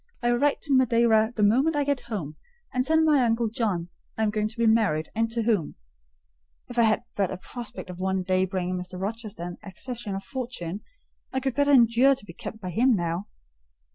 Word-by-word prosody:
I 240 - +3
will 240 - +1
write 290 +1 +2
to 285 - -1
Madeira 230 -3 +4
the 210 - +1
moment 265 +10 +3
I 290 - +2
get 285 -1 0
home, 200 -12 -5 0.4
and 255 - +1
tell 320 +4 +3
my 295 -4 +4
uncle 230 -1 +1
John 205 -7 -1 0.3
I 220 - +1
am 210 - +2
going 215 0 0
to 220 - -11
be 230 - +2
married, 210 -9 +2
and 225 +1 0
to 230 0 -1
whom: 210 -9 0 0.9
if 245 -1 -3
I - - +7
had 220 0 +3
but 195 -3 +1
a - - -4
prospect 220 -1 -7
of 180 - -10
one 190 0 0
day 185 0 +2
bringing 185 -1 -2
Mr. 180 0 -7
Rochester 210 -2 -5
an 175 0 -6
accession 215 +2 -6
of 195 - -5
fortune, 215 -7 -5 0.5
I 265 - 0
could 265 -1 -1
better 285 +1 +2
endure 255 +1 +5
to 260 - -12
be 170 - -10
kept 220 - -8
by 185 -3 -5
him 240 +6 +3
now." 175 +1 -2
220 Hz, 215 wpm, -26 LUFS, 190-245 Hz, 0.9 s, I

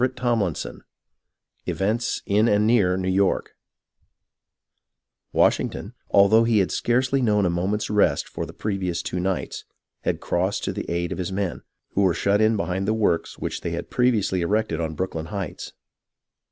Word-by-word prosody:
CHAPTER 120 -7 +1
XIII - - -5 1.0
EVENTS 110 +5 -1
IN 105 +3 +3
AND 105 -1 +3
NEAR 100 -6 +3
NEW 95 0 -2
YORK 95 0 +1 1.8
Washington, - - +1 0.2
although 100 +3 +6
he 115 -1 +2
had 95 -3 +2
scarcely 130 +3 +1
known 105 -4 +2
a 90 - +2
mo 85 +2 -1
ment's 105 +1 -1
rest 100 -9 +2
for - - -5
the - - -9
previous 95 -5 -2
two 90 - -3
nights, 95 0 -2 0.4
had - - -1
crossed 95 +3 -1
to - - -2
the - - -5
aid 85 0 -1
of - - -4
his 90 +1 -3
men, 95 -2 -2 0.3
who 100 - +1
were 95 -4 +3
shut 100 +4 +2
in 110 0 +3
behind 95 0 -2
the 110 - +2
works 105 -6 0
which - - -4
they - - -3
had - - -5
previously 110 -7 +2
erected 95 -2 0
on 80 -1 -3
Brooklyn 80 -2 -3
Heights. 95 -2 -5
100 Hz, 165 wpm, -24 LUFS, 90-110 Hz, 1.8 s, although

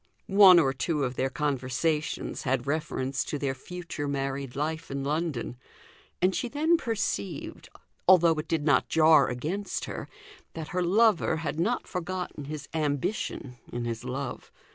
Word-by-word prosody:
One 195 -2 +8
or 135 -5 +4
two 150 +2 -1
of 125 -1 -2
their 130 +1 0
conversations 150 +2 -1
had 130 -2 0
reference 140 -3 -1
to 150 - -3
their 140 -2 -1
future 170 +1 -6
married 135 -2 -3
life 160 +3 -3
in 140 0 -3
London; 145 -5 -2 0.7
and 185 +1 +4
she 245 - -2
then 310 +6 +3
perceived, 220 - -3 0.4
although 175 -3 +7
it 155 - -5
did 160 -3 0
not 145 - +3
jar 155 -3 +6
against 165 +11 -3
her, - - -6 0.5
that 160 -1 -6
her 180 - -1
lover 200 0 +3
had 155 - -2
not 225 +9 0
forgotten 180 -4 -4
his 145 -1 -6
ambition 145 - -2
in 120 0 -3
his 115 0 -4
love. 130 +1 -5
150 Hz, 150 wpm, -28 LUFS, 135-175 Hz, 0.7 s, One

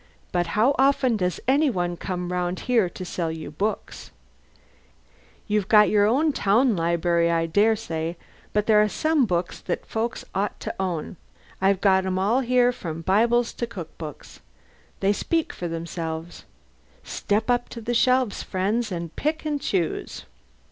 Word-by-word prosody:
"But 175 -1 0
how 240 +6 +4
often 270 -3 +3
does 180 -3 -1
any 285 +3 +4
one 175 -6 -1
come 180 0 -4
round 180 0 -2
here 230 -7 +2
to 185 - -8
sell 170 -2 -2
you 160 -2 -7
books? 200 +7 -4 1.4
You've 210 -2 0
got 210 -1 +6
your 230 +10 +3
town 230 0 +3
library, 170 0 +1
I 165 0 +1
dare 205 +7 +3
say; 165 -6 -4 0.3
but 210 0 +1
there 215 -1 +5
are 210 - +2
some 310 0 +1
books 175 -2 -2
that 175 - -4
folks 230 +2 -3
ought 195 +1 -2
to - - -4
own. 180 -2 -3 0.4
I've 195 0 +2
got 190 -2 +3
'em 185 0 -1
all 205 +7 +2
here 250 -1 +3
from 165 -8 -6
Bibles 235 +6 +2
to 235 - -3
cook 180 -8 -8
books. 155 -3 -9 0.6
They'll 195 +1 +3
speak 325 +9 -1
for 175 - -5
themselves. 165 0 -5 0.6
Step 220 +4 -1
up 245 0 0
to 235 - -7
the 230 +2 -3
shelves, 255 -1 +2
friends, 205 +4 -1
and 170 -2 -5
pick 310 +1 -2
and 295 -2 -1
choose." 180 - -2
200 Hz, 160 wpm, -24 LUFS, 175-235 Hz, 1.4 s, got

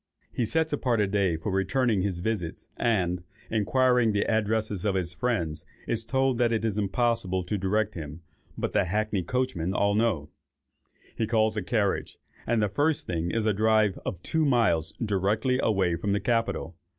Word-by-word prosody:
He 120 - 0
sets 160 +6 +1
apart 125 -5 +1
a 105 - +3
day 95 -4 +1
for 90 +6 -4
returning 100 +3 +1
his 90 -3 -2
visits; 95 -5 -3
and, 90 -6 +1 0.3
inquiring 125 +1 +3
the 105 - +1
addresses 110 -3 0
of 100 -3 +1
his 90 -2 -1
friends, 85 -9 -1 0.2
is 115 -1 -1
told 130 +1 +1
that 120 -1 +3
it 115 -1 0
is 105 -2 0
impossible 100 -3 0
to 90 +4 -3
direct 105 +2 0
him, 80 -1 -7 0.4
but - - -2
the - - +3
hackney 105 +1 0
coachmen 95 -4 -1
all 100 0 +2
know. 100 -10 0 0.8
He 110 - -1
calls 110 -1 +2
a 105 - -1
carriage, 100 0 -1 0.3
and 115 -2 +2
the - - +3
first 145 +9 0
thing 85 -1 -2
is 110 +3 -1
a 110 - +3
drive 110 -1 +2
of 90 - -4
two 160 0 0
miles 115 - +2
directly 110 +4 0
away 95 -5 +2
from 100 +4 -1
the 100 - +1
Capitol. 115 -8 -1
105 Hz, 175 wpm, -27 LUFS, 95-115 Hz, 0.8 s, a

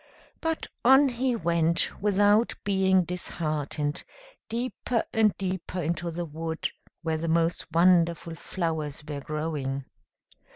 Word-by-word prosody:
But 325 -1 -1 0.2
on 265 +3 +7
he 250 0 0
went, 170 -4 +1
without 205 +2 +3
being 190 -2 +3
disheartened, 155 -3 -3 0.5
deeper 240 0 -1
and 220 -2 +3
deeper 185 -1 -3
into 170 +1 -1
the 170 +1 -3
wood, 160 +1 -3 0.3
where 160 -1 0
the 165 +1 -3
most 165 +1 +1
wonderful 170 -1 +3
flowers 160 -3 -3
were 145 -2 -4
growing. 145 -3 -3
170 Hz, 115 wpm, -27 LUFS, 160-200 Hz, 0.5 s, on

